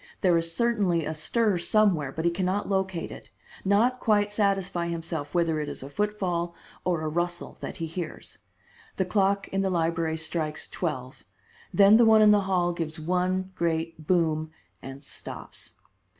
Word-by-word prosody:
There 180 Hz, -3 st, +4 dB
is 165 Hz, 0 st, +1 dB
certainly 195 Hz, -6 st, +1 dB
a 155 Hz, -, -2 dB
stir 200 Hz, +5 st, +1 dB
somewhere, 175 Hz, -8 st, +3 dB
but 160 Hz, +4 st, -4 dB
he 170 Hz, -, +4 dB
can 180 Hz, +2 st, -1 dB
not 200 Hz, +3 st, -1 dB
locate 190 Hz, -3 st, -1 dB
it, -, -, -11 dB, 0.3 s
not 225 Hz, +6 st, +3 dB
quite 205 Hz, -3 st, +2 dB
satisfy 195 Hz, -4 st, 0 dB
himself 165 Hz, -2 st, -4 dB
whether 165 Hz, -2 st, +2 dB
it 150 Hz, -, -3 dB
is -, -, -6 dB
a 140 Hz, -, -9 dB
footfall 180 Hz, -4 st, -1 dB, 0.3 s
or 175 Hz, -3 st, 0 dB
a 155 Hz, -, -2 dB
rustle 175 Hz, +2 st, -2 dB
that -, -, -6 dB
he 165 Hz, -, -3 dB
hears. 165 Hz, 0 st, -7 dB, 0.6 s
The 190 Hz, -, 0 dB
clock 200 Hz, +1 st, +1 dB
in 195 Hz, -, 0 dB
the 195 Hz, -, +1 dB
library 165 Hz, -2 st, 0 dB
strikes 160 Hz, -1 st, -3 dB
twelve, 130 Hz, -7 st, -4 dB, 0.5 s
then 200 Hz, +2 st, +7 dB
the 235 Hz, -, +6 dB
one 220 Hz, -1 st, +6 dB
in 210 Hz, -, +7 dB
the 205 Hz, -1 st, +5 dB
hall 175 Hz, -2 st, +2 dB
gives 165 Hz, -2 st, -4 dB
one 185 Hz, +3 st, -1 dB
great 165 Hz, -2 st, -2 dB
boom, 160 Hz, -3 st, +1 dB, 0.3 s
and 135 Hz, +2 st, -9 dB
stops. -, -, -8 dB
175 Hz, 170 wpm, -27 LUFS, 160-195 Hz, 0.6 s, then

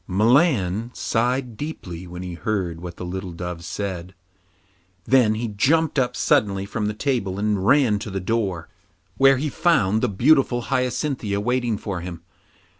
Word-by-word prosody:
Milan 110 Hz, -, +2 dB
sighed 125 Hz, +1 st, -1 dB
deeply 95 Hz, -, -6 dB
when 90 Hz, +1 st, -7 dB
he 90 Hz, -1 st, -6 dB
heard 85 Hz, -3 st, -3 dB
what 90 Hz, -1 st, -7 dB
the 90 Hz, -, -6 dB
little 95 Hz, 0 st, -5 dB
dove 90 Hz, 0 st, -6 dB
said. 95 Hz, -2 st, -5 dB, 0.9 s
Then 125 Hz, -5 st, +4 dB
he 115 Hz, +2 st, -2 dB
jumped 150 Hz, +9 st, +2 dB
up 125 Hz, -1 st, 0 dB
suddenly 100 Hz, -4 st, +1 dB
from 105 Hz, +1 st, -3 dB
the 105 Hz, -, -3 dB
table 105 Hz, -6 st, -1 dB
and 105 Hz, -2 st, 0 dB
ran 125 Hz, -7 st, +4 dB
to 105 Hz, -, -6 dB
the 95 Hz, -1 st, -3 dB
door, 95 Hz, -4 st, -2 dB, 0.5 s
where 135 Hz, 0 st, +6 dB
he 150 Hz, +4 st, -1 dB
found 115 Hz, -, +2 dB
the 125 Hz, -, +1 dB
beautiful 125 Hz, +3 st, +3 dB
Hyacinthia 125 Hz, -5 st, -1 dB
waiting 120 Hz, 0 st, 0 dB
for 100 Hz, -3 st, -4 dB
him. 85 Hz, -1 st, -7 dB
105 Hz, 155 wpm, -23 LUFS, 95-125 Hz, 0.9 s, where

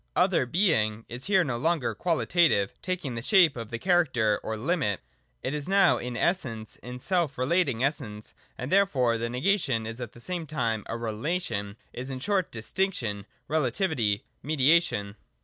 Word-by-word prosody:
Other 125 Hz, -, +3 dB
being 115 Hz, -, +1 dB
is 120 Hz, +2 st, -5 dB
here 190 Hz, -2 st, +4 dB
no 130 Hz, -6 st, -2 dB
longer 135 Hz, -4 st, 0 dB
qualitative, 165 Hz, -, +2 dB
taking 180 Hz, -8 st, -3 dB
the 115 Hz, -, -4 dB
shape 175 Hz, -, +5 dB
of 115 Hz, -3 st, -6 dB
the 115 Hz, -, -3 dB
character 130 Hz, -, +2 dB
or 110 Hz, -, -4 dB
limit. 130 Hz, -, 0 dB, 0.4 s
It 130 Hz, -, -2 dB
is 150 Hz, +3 st, -3 dB
now 195 Hz, 0 st, +5 dB
in 125 Hz, -1 st, -4 dB
Essence, 125 Hz, -, -1 dB
in 125 Hz, +1 st, -8 dB
self 170 Hz, -2 st, 0 dB
relating 135 Hz, -2 st, +1 dB
essence, 125 Hz, -7 st, -3 dB, 0.2 s
and 125 Hz, +3 st, -5 dB
therefore 130 Hz, -, +3 dB
the 115 Hz, +1 st, -2 dB
negation 130 Hz, -, +1 dB
is 115 Hz, +2 st, -6 dB
at 120 Hz, -, -6 dB
the -, -, -14 dB
same 170 Hz, +4 st, -4 dB
time 115 Hz, -8 st, -1 dB
a 115 Hz, -, -3 dB
relation, 115 Hz, -, -3 dB
— -, -, -38 dB
is, 130 Hz, +2 st, -5 dB
in 130 Hz, -1 st, -4 dB
short, 190 Hz, +4 st, 0 dB
Distinction, 115 Hz, -, -2 dB, 0.2 s
Re 160 Hz, +1 st, +1 dB
lativity, 125 Hz, -, 0 dB, 0.2 s
Mediation. 140 Hz, -8 st, +2 dB
130 Hz, 165 wpm, -27 LUFS, 115-170 Hz, 0.4 s, shape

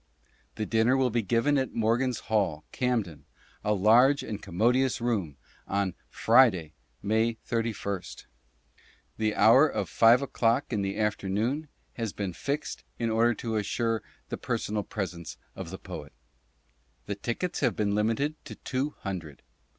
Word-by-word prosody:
The 110 Hz, -, -2 dB
Dinner 115 Hz, +4 st, +3 dB
will 130 Hz, -2 st, +2 dB
be 120 Hz, +1 st, +1 dB
given 120 Hz, +7 st, +2 dB
at 130 Hz, -, -3 dB
Morgan's 120 Hz, +3 st, +1 dB
Hall, 95 Hz, -9 st, 0 dB
Camden 110 Hz, -, -1 dB, 0.4 s
(a 105 Hz, 0 st, +2 dB
large 120 Hz, +8 st, +5 dB
and 105 Hz, -1 st, -5 dB
com 85 Hz, -, -10 dB
modious 125 Hz, +4 st, +3 dB
room), 100 Hz, -, -1 dB, 0.3 s
on 100 Hz, -2 st, 0 dB, 0.2 s
FRIDAY, 110 Hz, -10 st, +4 dB, 0.3 s
MAY 110 Hz, +2 st, +1 dB
31st. 110 Hz, -5 st, -3 dB, 0.9 s
The 110 Hz, -1 st, 0 dB
hour 130 Hz, +7 st, +7 dB
of -, -, -3 dB
5 120 Hz, +4 st, +5 dB
O'CLOCK 125 Hz, 0 st, +1 dB
in 105 Hz, -, 0 dB
the 100 Hz, +1 st, -2 dB
Afternoon 110 Hz, +7 st, -1 dB, 0.3 s
has 115 Hz, -4 st, -3 dB
been 100 Hz, -3 st, -3 dB
fixed 140 Hz, -, -3 dB
in 115 Hz, -1 st, -1 dB
order 115 Hz, +1 st, +3 dB
to 115 Hz, -1 st, -3 dB
assure 115 Hz, +2 st, 0 dB, 0.3 s
the -, -, -3 dB
personal 105 Hz, 0 st, -2 dB
presence 90 Hz, -6 st, -5 dB, 0.2 s
of -, -, -6 dB
the -, -, -6 dB
Poet. -, -, -9 dB, 0.9 s
The 105 Hz, -, -3 dB
Tickets 120 Hz, -, -3 dB
have -, -, +1 dB
been 100 Hz, -1 st, 0 dB
limited 115 Hz, +9 st, 0 dB
to -, -, -8 dB
Two 135 Hz, +3 st, -3 dB
Hundred. 85 Hz, -7 st, -6 dB
110 Hz, 145 wpm, -28 LUFS, 100-125 Hz, 0.9 s, hour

